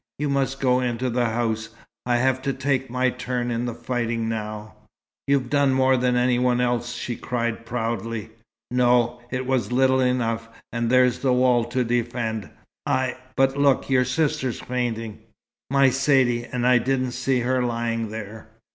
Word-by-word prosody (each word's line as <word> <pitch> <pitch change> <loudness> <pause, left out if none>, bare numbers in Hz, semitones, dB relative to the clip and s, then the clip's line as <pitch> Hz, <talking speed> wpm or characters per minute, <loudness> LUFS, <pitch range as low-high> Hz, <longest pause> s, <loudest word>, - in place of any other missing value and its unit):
You 145 0 -1
must 135 -1 0
go 125 -1 +3
into 125 0 -1
the 120 0 +1
house, 110 -1 -1 0.4
I 120 - +2
have 130 +1 +1
to 135 0 -1
take 135 -1 -1
my 125 +1 +1
turn 125 -1 -3
in 120 +1 -1
the 120 -2 -4
fighting 120 -1 -2
now 110 -1 -5 0.3
" 105 +2 -71
"You've 135 -3 +1
done 140 -2 +3
more 130 0 +4
than 125 0 +1
any 125 0 +2
one 125 -1 +2
else!" 120 0 0
she 120 0 -4
cried, 115 -1 -3
proudly. 115 -2 -3 0.4
"No, 125 -1 +2
it 130 0 -3
was 130 -2 0
little 130 +1 +3
enough. 115 -3 0 0.2
And 115 -1 -1
there's 125 -1 +4
the 130 -2 +2
wall 125 -2 +3
to 125 +2 -1
defend. 120 -3 -2 0.4
I 130 -3 0 0.2
but 135 0 +2
look, 140 -1 +2
your 130 -1 +4
sister's 140 -2 -1
fainting." 115 -3 -3 0.5
"My 135 -1 +4
Saidee! 130 -3 +2
And 125 -1 -1
I 125 -1 +5
didn't 130 +1 0
see 125 +1 0
her 130 +1 +1
lying 115 -2 -1
there!" 110 0 -8
125 Hz, 170 wpm, -24 LUFS, 115-130 Hz, 0.5 s, I